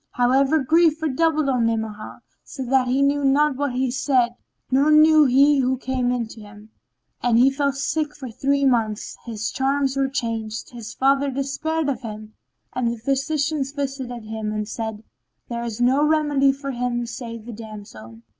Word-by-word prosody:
However 265 Hz, +5 st, +3 dB
grief 315 Hz, +2 st, +3 dB
redoubled 310 Hz, 0 st, +1 dB
on 250 Hz, -4 st, +2 dB
Ni'amah, 220 Hz, -2 st, -4 dB, 0.2 s
so 265 Hz, -2 st, -7 dB
that 255 Hz, 0 st, +2 dB
he 265 Hz, +3 st, +2 dB
knew 285 Hz, +1 st, +1 dB
not 285 Hz, +1 st, +3 dB
what 280 Hz, -1 st, -2 dB
he 255 Hz, 0 st, 0 dB
said 250 Hz, -2 st, +1 dB, 0.4 s
nor 275 Hz, +3 st, +3 dB
knew 310 Hz, 0 st, +6 dB
he 280 Hz, +2 st, +4 dB
who 260 Hz, 0 st, +1 dB
came 255 Hz, -1 st, -1 dB
in 245 Hz, -2 st, -1 dB
to 225 Hz, -, -11 dB
him, 210 Hz, +1 st, -14 dB, 0.5 s
and 240 Hz, -2 st, +2 dB
he 260 Hz, +3 st, +5 dB
fell 280 Hz, 0 st, 0 dB
sick 295 Hz, +2 st, -2 dB
for 260 Hz, -5 st, -8 dB
three 280 Hz, +4 st, 0 dB
months 225 Hz, -4 st, 0 dB
his 220 Hz, -2 st, -3 dB
charms 270 Hz, 0 st, 0 dB
were 270 Hz, 0 st, +1 dB
changed, 225 Hz, -4 st, -4 dB
his 235 Hz, -3 st, -9 dB
father 275 Hz, +1 st, +2 dB
despaired 280 Hz, +4 st, -2 dB
of 265 Hz, -3 st, -2 dB
him 215 Hz, -2 st, -8 dB, 0.4 s
and 250 Hz, -1 st, -1 dB
the 235 Hz, 0 st, -2 dB
physicians 275 Hz, +3 st, -1 dB
visited 265 Hz, -4 st, -4 dB
him 220 Hz, -1 st, -4 dB
and 215 Hz, -1 st, -3 dB
said, 220 Hz, -1 st, -5 dB, 0.5 s
"There 235 Hz, -1 st, -3 dB
is 230 Hz, -1 st, -5 dB
no 260 Hz, +4 st, +3 dB
remedy 295 Hz, -3 st, +3 dB
for 275 Hz, 0 st, -6 dB
him 240 Hz, -1 st, -2 dB
save 230 Hz, -2 st, -7 dB
the 240 Hz, -, -7 dB
damsel." 200 Hz, -, -11 dB
260 Hz, 175 wpm, -22 LUFS, 230-280 Hz, 0.5 s, knew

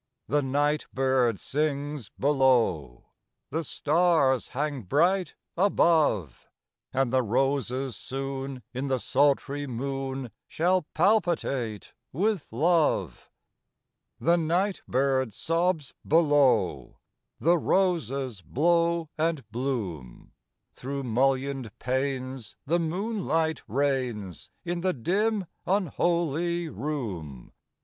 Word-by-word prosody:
The 145 Hz, +2 st, +2 dB
nightbird 135 Hz, -4 st, +1 dB
sings 145 Hz, -4 st, -2 dB
below; 120 Hz, -, +2 dB, 0.4 s
The 160 Hz, +4 st, -1 dB
stars 155 Hz, -4 st, +2 dB
hang 145 Hz, 0 st, -3 dB
bright 170 Hz, -, +1 dB, 0.2 s
above; 160 Hz, -, +2 dB, 0.4 s
And 130 Hz, -1 st, 0 dB
the 130 Hz, -, +4 dB
roses 130 Hz, +1 st, 0 dB
soon 135 Hz, -1 st, -5 dB
in 130 Hz, +3 st, -3 dB
the 135 Hz, -1 st, +1 dB
sultry 145 Hz, +2 st, +1 dB
moon 135 Hz, 0 st, -4 dB, 0.2 s
Shall 175 Hz, 0 st, +1 dB
palpitate 155 Hz, -, +1 dB, 0.2 s
with 195 Hz, +2 st, 0 dB
love. 145 Hz, -, +1 dB, 0.9 s
The 170 Hz, +1 st, +3 dB
nightbird 140 Hz, -, 0 dB
sobs 165 Hz, -, 0 dB
below; 135 Hz, -, +3 dB, 0.4 s
The 170 Hz, +2 st, +3 dB
roses 140 Hz, -, 0 dB
blow 170 Hz, -, +1 dB
and 160 Hz, -3 st, 0 dB
bloom; 105 Hz, -, -4 dB, 0.4 s
Through 140 Hz, +2 st, -5 dB
mullioned 130 Hz, -1 st, 0 dB
panes 130 Hz, -2 st, -3 dB
the 170 Hz, +5 st, +2 dB
moonlight 165 Hz, -3 st, -1 dB
rains 125 Hz, -, -2 dB, 0.2 s
In 175 Hz, 0 st, -2 dB
the 185 Hz, 0 st, +1 dB
dim, 200 Hz, -, 0 dB, 0.2 s
unholy 170 Hz, -2 st, 0 dB
room. 100 Hz, -, -5 dB
140 Hz, 90 wpm, -27 LUFS, 125-165 Hz, 0.9 s, the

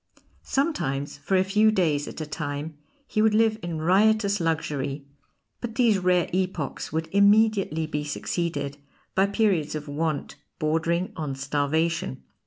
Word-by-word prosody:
Sometimes 145 Hz, -, -1 dB
for 185 Hz, +7 st, +1 dB
a 185 Hz, -, +4 dB
few 210 Hz, +3 st, +3 dB
days 160 Hz, -8 st, +1 dB
at -, -, -7 dB
a 155 Hz, -, -3 dB
time 150 Hz, 0 st, -4 dB, 0.3 s
he 215 Hz, -, 0 dB
would 215 Hz, -1 st, +4 dB
live 220 Hz, 0 st, +3 dB
in 170 Hz, -2 st, -4 dB
riotous 200 Hz, +4 st, +3 dB
luxury, 145 Hz, -4 st, -2 dB, 0.5 s
but 230 Hz, -2 st, -5 dB
these 230 Hz, -5 st, +3 dB
rare 180 Hz, -1 st, +2 dB
epochs 180 Hz, -5 st, -2 dB
would 160 Hz, +1 st, -2 dB
immediately 200 Hz, -5 st, +4 dB
be 150 Hz, -1 st, -3 dB
succeeded 145 Hz, -2 st, -3 dB, 0.3 s
by 190 Hz, +1 st, +3 dB
periods 200 Hz, -8 st, +1 dB
of 150 Hz, 0 st, -5 dB
want 150 Hz, 0 st, -2 dB, 0.2 s
bordering 165 Hz, +3 st, 0 dB
on 150 Hz, -4 st, -3 dB
starvation. 145 Hz, -, -1 dB
165 Hz, 140 wpm, -25 LUFS, 150-200 Hz, 0.5 s, a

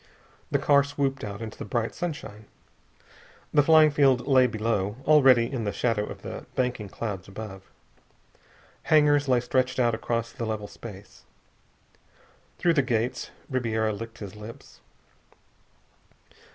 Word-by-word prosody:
The -, -, +2 dB
car 140 Hz, -1 st, +4 dB
swooped 140 Hz, -1 st, -2 dB
out 105 Hz, +1 st, -5 dB
into 110 Hz, -1 st, -7 dB
bright 115 Hz, +2 st, -2 dB
sunshine. 110 Hz, -11 st, -6 dB, 1.1 s
The 150 Hz, -, +6 dB
flying 155 Hz, +1 st, +6 dB
field 135 Hz, -4 st, +3 dB
lay 130 Hz, -2 st, +5 dB
below, 110 Hz, -3 st, -1 dB
already 135 Hz, -6 st, +6 dB
in 120 Hz, -1 st, -4 dB
the 100 Hz, -, -1 dB
shadow 115 Hz, -2 st, 0 dB
of -, -, -9 dB
the -, -, -7 dB
banking 125 Hz, -5 st, -1 dB
clouds 100 Hz, -3 st, -5 dB
above. 95 Hz, -1 st, -9 dB, 1.2 s
Hangars 145 Hz, -2 st, +4 dB
lay 125 Hz, -2 st, +3 dB
stretched 130 Hz, +1 st, 0 dB
out 120 Hz, -2 st, +3 dB
across 115 Hz, +1 st, -2 dB
the 115 Hz, -, -5 dB
level 110 Hz, -2 st, -3 dB
space. 100 Hz, -2 st, -12 dB, 1.4 s
Through 170 Hz, -, +2 dB
the 145 Hz, -, +3 dB
gates. 125 Hz, 0 st, -1 dB, 0.2 s
Ribiera 110 Hz, -4 st, -1 dB
licked 115 Hz, +2 st, -8 dB
his 100 Hz, -1 st, -8 dB
lips. 105 Hz, +2 st, -12 dB
120 Hz, 130 wpm, -26 LUFS, 110-135 Hz, 1.4 s, The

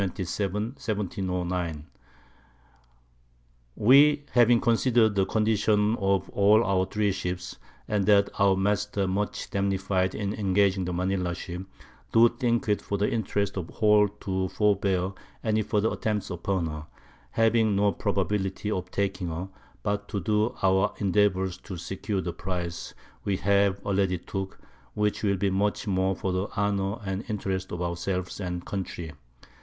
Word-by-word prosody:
1709_. 95 Hz, -, -2 dB, 1.9 s
We 145 Hz, +5 st, +5 dB
having 120 Hz, -1 st, +5 dB
consider'd 115 Hz, -2 st, +3 dB
the 95 Hz, -1 st, +1 dB
Condition 105 Hz, 0 st, +2 dB
of 95 Hz, -1 st, +1 dB
all 105 Hz, +3 st, +5 dB
our 95 Hz, -2 st, +1 dB
3 105 Hz, -1 st, 0 dB
Ships, 90 Hz, -3 st, -4 dB, 0.3 s
and 100 Hz, -2 st, 0 dB
that 100 Hz, -1 st, +5 dB
our 100 Hz, -1 st, +5 dB
Masts 105 Hz, +2 st, 0 dB
are 100 Hz, -1 st, +2 dB
much 100 Hz, +2 st, -2 dB
damnified 95 Hz, -1 st, 0 dB
in 100 Hz, -1 st, -2 dB
engaging 95 Hz, -2 st, +2 dB
the 90 Hz, -, -2 dB
Manila 90 Hz, 0 st, -1 dB
_Ship, 90 Hz, +2 st, -7 dB, 0.4 s
do 115 Hz, +1 st, +7 dB
think 120 Hz, -1 st, -1 dB
it 105 Hz, -1 st, +1 dB
for 100 Hz, -, -3 dB
the 100 Hz, -, +1 dB
Interest 100 Hz, -2 st, -1 dB
of 90 Hz, -4 st, -3 dB
the -, -, -14 dB
whole 105 Hz, -2 st, +4 dB
to 95 Hz, -1 st, -1 dB
forbear 100 Hz, -2 st, +1 dB, 0.3 s
any 110 Hz, -1 st, +1 dB
further 105 Hz, +1 st, 0 dB
Attempts 105 Hz, -3 st, -2 dB
upon 90 Hz, 0 st, -1 dB
her, 75 Hz, -1 st, -6 dB, 0.4 s
having 115 Hz, -2 st, +3 dB
no 100 Hz, +1 st, +3 dB
Probability 100 Hz, +1 st, -1 dB
of 90 Hz, -3 st, -3 dB
taking 100 Hz, -2 st, -2 dB
her, 85 Hz, +3 st, -4 dB, 0.3 s
but 105 Hz, 0 st, -1 dB
to 100 Hz, -, -3 dB
do 105 Hz, +4 st, 0 dB
our 95 Hz, +1 st, +3 dB
endeavours 95 Hz, -2 st, +1 dB
to 95 Hz, -4 st, -8 dB
secure 95 Hz, +3 st, -3 dB
the 85 Hz, -1 st, -4 dB
Prize 90 Hz, -2 st, -5 dB, 0.3 s
we 100 Hz, -2 st, 0 dB
have 100 Hz, 0 st, +2 dB
already 95 Hz, -2 st, +1 dB
took, 95 Hz, +3 st, -6 dB, 0.4 s
which 105 Hz, 0 st, 0 dB
will 100 Hz, -2 st, +1 dB
be 100 Hz, +1 st, 0 dB
much 100 Hz, +3 st, 0 dB
more 95 Hz, -1 st, +1 dB
for 95 Hz, -, -2 dB
the 95 Hz, +2 st, -1 dB
Honour 100 Hz, +1 st, 0 dB
and 95 Hz, +2 st, -3 dB
Interest 95 Hz, -3 st, -3 dB
of 90 Hz, 0 st, -3 dB
our 85 Hz, 0 st, -2 dB
selves 90 Hz, +2 st, -3 dB
and 90 Hz, -2 st, -4 dB
Country. 90 Hz, -4 st, -5 dB
100 Hz, 150 wpm, -27 LUFS, 95-105 Hz, 1.9 s, do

